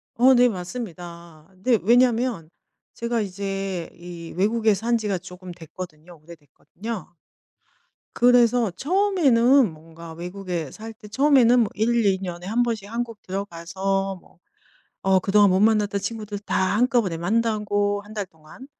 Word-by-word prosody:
어 255 +3 +6
네. 245 0 +5
맞습니다. 175 -5 -8
네. 240 -5 +3
왜냐면 235 -5 +2 0.4
제가 235 -1 -2
이제 195 -2 -4
이 170 -1 -10
외국에 215 +2 +2
산 235 +4 0
지가 210 -4 -2
쪼금 180 0 -11
됐거든요. 165 0 -11
오래됐거든요. 170 - -9 1.0
그래서 245 -2 +4
처음에는 275 - +3
뭔가 165 +1 -12
외국에 175 -2 -5
살 225 +1 -9
때 210 -1 -14
처음에는 250 0 +4
뭐 215 - +1
1-2 215 -3 +2
년에 175 -1 -6
1 225 +5 0
번씩 220 -3 -4
한국 230 -2 -4
들어가서 195 +1 -3
뭐 - - -24 0.6
어 190 -1 +3
그동안 200 +1 +4
못 185 +1 +2
만났던 210 -2 +2
친구들 210 -1 -5
다 210 - -3 0.2
한꺼번에 235 -8 +2
만나고 205 +1 0
1 210 +1 -13
달 205 -3 -3
동안. 160 - -15
205 Hz, 270 characters per minute, -23 LUFS, 180-230 Hz, 1.0 s, 어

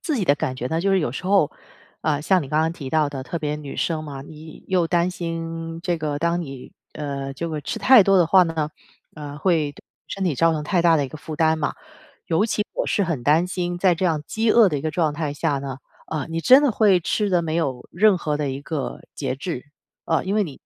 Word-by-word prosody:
自 310 -4 -1
己 205 - 0
的 140 - +4
感 145 -3 -3
觉 125 - -3
呢， 160 +1 -1
就 195 +2 +1
是 195 - +4
有 140 -7 -1
时 180 - -6
候， 195 -6 +3 0.5
呃， 150 -2 0
像 185 +1 +3
你 135 - -8
刚 155 +2 +2
刚 160 +1 +1
提 145 -5 -7
到 155 +1 +2
的 135 -2 -5
特 170 +5 -4
别 150 -1 -2
女 145 -2 -8
生 160 -2 -1
嘛， 140 -3 -7
你 155 +2 -12
又 180 -3 +2
担 175 +1 +1
心 165 -1 -5
这 175 -2 -1
个， 150 -2 -2
当 170 +2 0
你 135 -5 -8 0.2
呃， 140 -2 -5
这 170 +4 -4
个 155 -2 -4
吃 145 - -4
太 255 -5 +7
多 195 +1 +4
的 175 -3 +5
话 185 +2 +6
呢， 160 -2 -2 0.4
呃， 145 -2 -8
会 155 -3 +1
对 - - -17 0.3
身 195 -1 -3
体 165 -6 +1
造 165 +5 +3
成 150 -1 -2
太 175 +2 +1
大 165 -1 +5
的 145 - +1
一 135 - -5
个 155 - -9
负 155 +1 -7
担 160 0 +2
嘛。 145 - -1 0.5
尤 165 +5 +2
其 210 -1 -1
我 - - -2
是 200 - +1
很 160 -8 -2
担 155 +7 +3
心 175 -1 -3
在 180 -1 +4
这 170 - -3
样 155 -3 0
饥 225 0 0
饿 225 -4 +6
的 150 - -2
一 - - -6
个 155 +1 -2
状 155 -2 0
态 150 -1 -3
下 140 -1 0
呢， 135 -1 -6 0.3
呃， 155 -3 -2
你 165 0 -2
真 260 - +7
的 280 - +3
会 205 -4 +4
吃 205 +4 -1
得 175 -2 +2
没 160 -1 -3
有 135 -7 -2
任 205 +2 +4
何 150 -3 -1
的 145 -2 -1
一 135 +1 -5
个 150 -2 -4
节 135 -2 -3
制。 145 -2 -5 0.4
呃， 160 - +1
因 195 +2 -1
为 215 - +3
你 150 -7 -10
160 Hz, 275 characters per minute, -23 LUFS, 145-180 Hz, 0.5 s, 太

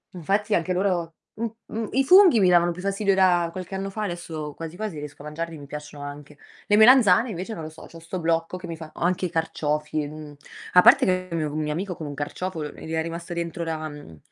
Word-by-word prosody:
Infatti 200 +5 0
anche 180 +2 +1
loro 180 -3 -1 0.2
m 230 +2 -2 0.3
m 225 -1 -2
i 270 +2 +3
funghi 360 - +7
mi 185 - +4
davano 175 0 +4
più 180 +1 -7
fastidio 200 0 +1
da 175 -3 +3
qualche 185 +2 -7
anno 195 +1 -3
fa, 215 +2 -5
adesso 160 -5 -5
quasi 165 +1 -8
quasi 205 -7 -5
riesco 145 -1 -9
a - - -11
mangiarli, 165 +1 -5
mi 145 - -10
piacciono 150 0 -8
anche. 145 0 -9 0.3
Le 205 - +4
melanzane 230 -1 +6
invece, 190 +3 -5
non 165 - -7
lo 155 - -6
so, 160 - -13
c'ho 165 - -13
sto 170 +3 -6
blocco 165 +2 0
che 180 -1 -9
mi 165 - -5
fa 160 -1 -10
o - - -12
anche 180 +1 +1
i - - -2
carciofi, 150 -2 -1
mhmm, 150 -1 -10 0.4
a 180 - +8
parte - - +7
che 185 0 0
con 165 -1 -2
un 150 0 -2
mio 150 - -2
amico 180 +3 -3
con 155 - -7
un 145 - -5
carciofo 160 +4 -4
l 150 -1 -5
gli 160 - -9
era 160 0 0
rimasto 170 +2 -5
dentro 170 0 -3
la 155 -1 -3
mhmm, 145 - -11
170 Hz, 245 wpm, -24 LUFS, 155-190 Hz, 0.4 s, a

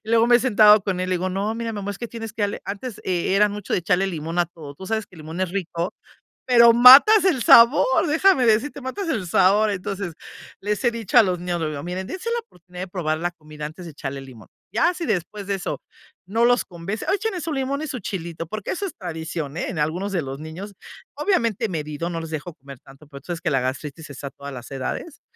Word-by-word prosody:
y 220 - -14
luego 230 0 +4
me 240 - +7
he - - 0
sentado 215 -4 +6
con 185 -2 -2
él, 185 - -2
le 185 - +2
digo: 185 +2 -2
"No, 195 +3 -2
mira, 230 -1 -3
mi 205 - -5
amor, 200 +1 -4
es 200 - -7
que 235 - -4
tienes 225 -2 -7
que 220 - -4
darle", 205 0 -1
antes 205 +3 -6
e 185 +1 0
era 210 +1 +5
mucho 205 -1 -6
de - - +2
echarle 180 +3 +1
limón 165 -1 -4
a 175 - +3
todo, 155 -4 -11
tú 190 - -9
sabes 220 0 -1
que - - -18
el - - -13
limón 160 +4 -7
es 185 -2 -1
rico, 175 -2 -3 0.5
pero 235 -2 +7
matas 270 - +9
el 345 -10 +2
sabor, 265 - +6
déjame 320 -3 +4
decirte, 255 +6 +1
matas 335 +9 -4
el 220 - -2
sabor. 195 +5 +4
Entonces 195 -3 -4 0.5
les 210 +4 -2
he 240 - +4
dicho 230 -3 -6
a - - +10
los 180 -2 -1
niños, 175 -1 -3
lo 155 - -1
digo: 145 -2 -6
"Miren, 180 +2 -4
dense 380 +5 -5
la 475 - 0
oportunidad 180 - -12
de - - -6
probar 160 -4 -2
la 175 +1 -1
comida 155 -2 -10
antes 160 +4 -8
de 165 - -8
echarle 140 -2 -6
limón, 130 -5 -13 0.3
ya 345 +2 +3
si 340 - -4
después 205 - -3
de 200 - 0
eso 190 - -4 0.5
no 225 +5 +2
los 245 0 +3
convence, 180 +5 -6
échenle 410 -2 -2
su 320 - -4
limón 275 +1 -2
y - - -4
su 255 - -5
chilito", 170 -4 -5
porque 215 +2 -5
eso 395 +2 -3
es - - -8
tradición, 160 -3 -5
eh, - - -2
en 180 - -5
algunos 170 +7 -1
de 175 -6 -1
los 135 +1 -6
niños, 175 +7 -8 0.4
obviamente 235 - 0
medido, 155 0 -4
no 165 -1 -4
les 165 -1 -7
dejo 155 +2 -5
comer 135 -1 -12
tanto, 135 +3 -17
pero 140 -2 -11
tú - - -22
sabes 170 -2 -4
que 170 - 0
la 135 - +2
gastritis 140 +4 -5
está 140 0 -7
a 140 - -8
todas 140 +1 -9
las 120 -2 -9
edades, 135 - -5
190 Hz, 250 wpm, -23 LUFS, 165-230 Hz, 0.5 s, a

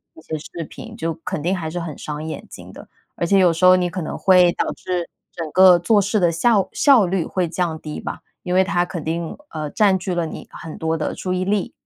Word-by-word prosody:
一 325 - -14
些 155 - -5
视 165 +2 -7
频， 230 -2 -10
就 165 -3 -2
肯 150 - -3
定 180 +4 0
还 160 -3 -4
是 175 +2 -4
很 165 -4 -6
伤 150 0 -6
眼 160 - -6
睛 - - -11
的。 - - -13 0.3
而 - - -1
且 195 +3 +3
有 180 -2 +5
时 170 +3 +1
候 185 0 +8
你 180 -1 0
可 180 +2 -5
能 - - -5
会 180 -2 +5
导 - - -2
致 180 -2 -4 0.2
整 165 -3 -6
个 185 0 +7
做 205 +5 +3
事 205 +2 +1
的 175 -3 +3
效 200 +3 +2
效 260 -9 +5
率 175 -2 -1
会 180 -3 -1
降 170 -3 -2
低 150 -1 -6
吧， - - -6 0.2
因 180 - -3
为 185 - +5
它 180 -2 0
肯 170 -3 -6
定， 165 +1 -3
呃， 155 -2 -4
占 200 -3 +3
据 180 0 -4
了 170 -2 -1
你 - - -9
很 160 - -9
多 160 0 -1
的 155 - -3
注 185 - -3
意 185 0 -1
力。 200 0 -1
175 Hz, 270 characters per minute, -21 LUFS, 165-190 Hz, 0.3 s, 候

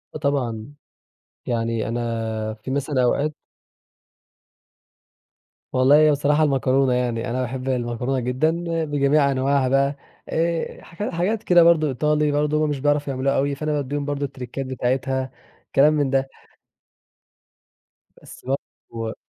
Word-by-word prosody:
آه - - -1
طبعًا، 135 -4 -2 0.7
يعني 115 -2 -1
أنا 115 -2 -3
في 110 +4 -8
مثلًا 140 -1 0
أوقات 145 +5 +1 2.4
والله 130 +3 +5
هي 155 0 +6
بصراحة 145 +2 +2
المكرونة 135 -2 +2
يعني. 120 -1 -1
أنا 125 +2 -1
باحب 130 +1 -4
المكرونة 125 +1 -1
جدًا 125 +6 +1 0.3
بجميع 145 -1 +2
أنواعها 135 0 +1
بقى 140 +1 +2 0.3
آآ، 165 0 -1
حاجات 175 +5 -6
حاجات 195 +6 -1
كده 175 -1 +6
برضه 165 -2 +4
إيطالي 150 +2 +1
برضو 150 +1 +1
هُم 150 - +1
مش 145 -2 -2
بيعرفوا 145 0 +1
يعملوها 135 +1 0
أوي 140 +1 0
فأنا 150 +1 -3
بادّيهم 145 0 -2
برضه 145 -1 -2
التريكات 135 0 -6
بتاعتها، 130 +1 -1 0.4
كلام 150 +3 +6
من 145 -3 +1
ده. 135 0 0 1.9
بس - - -14
برضه 115 -4 -5
135 Hz, 125 wpm, -22 LUFS, 125-150 Hz, 2.4 s, هي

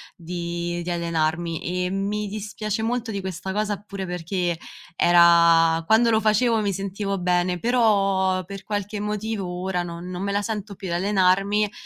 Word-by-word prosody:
di 175 0 -4
di 175 - -3
allenarmi 170 +1 -1
e 180 - -1
mi 205 +2 -2
dispiace 215 +1 -4
molto 230 0 -2
di 200 - -3
questa 190 0 -5
cosa, 205 -1 -1
pure 200 -2 -6
perché 180 0 -2 0.4
era 170 -1 +5
quando 230 +3 +5
lo 220 - +4
facevo 225 +1 +2
mi 205 -2 0
sentivo 195 +1 -3
bene, 180 0 +1
però 195 -6 +2
per 195 +2 -9
qualche 205 +1 -3
motivo 210 -1 -3 0.2
ora 185 -2 -1
non 175 +1 -7
non 180 0 -5
me 200 0 -2
la 205 - +1
sento 210 -2 -4
più 190 -1 -7
e - - -3
allenarmi, 195 +2 +2
195 Hz, 160 wpm, -24 LUFS, 175-210 Hz, 0.4 s, era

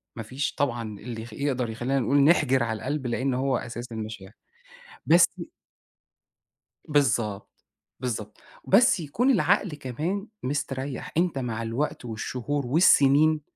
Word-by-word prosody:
ما 115 - -5
فيش 130 +6 -3
طبعًا 120 -6 -2
اللي 115 -1 -6
يخ 115 -1 -10
يقدر 130 -2 -1
يخلّينا 120 +5 -1
نقول 135 +3 +1
نحِجر 140 -5 +4
على 110 -1 -2
القلب، 135 +3 -3
لإن 130 +3 -1
هو 130 +1 0
أساس 120 0 -7
المشاعر. 110 -3 -7 0.7
بس - - +6 1.6
بالضبط، 115 -9 0 0.3
بالضبط. 110 -4 -4 0.3
بس 215 +1 +5
يكون 190 - +1
العقل 205 -3 +2
كمان 155 - -4 0.2
مستريّح، 135 -1 -3
أنت 170 -4 +1
مع 115 -3 -3
الوقت 120 +4 -3
والشهور 125 +5 -3
والسنين، 150 +1 +5
130 Hz, 125 wpm, -26 LUFS, 115-145 Hz, 1.6 s, بس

